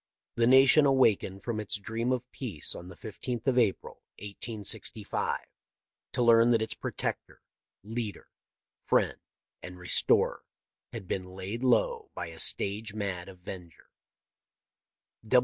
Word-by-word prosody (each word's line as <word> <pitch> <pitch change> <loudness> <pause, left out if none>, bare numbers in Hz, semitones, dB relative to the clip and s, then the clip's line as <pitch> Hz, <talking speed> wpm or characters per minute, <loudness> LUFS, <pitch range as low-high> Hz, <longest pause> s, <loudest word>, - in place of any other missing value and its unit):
The 115 0 +2
nation 135 +3 +7
awakened 110 -7 +2
from 115 -3 -2
its 105 0 -2
dream 115 +4 -2
of 125 -1 0
peace 110 - -3
on 90 - -9
the 90 - -11
15th 115 +4 -6
of 130 -2 +3
April, 110 -5 -1 0.2
1865, 105 +1 -3 0.7
to 125 - +1
learn 115 0 +6
that 115 -2 +3
its 110 - -4
protector, - - -5 0.4
leader, 110 -2 -5 0.6
friend, - - +1 0.4
and 90 0 -9
restorer 90 0 +2 0.5
had 95 - -7
been 95 0 -2
laid 95 +6 -6
low 445 - +2
by 85 - -5
a 80 0 -11
stage 105 +2 +1
mad 95 -3 -4
'avenger.' 90 -2 -11
110 Hz, 125 wpm, -29 LUFS, 95-120 Hz, 0.7 s, nation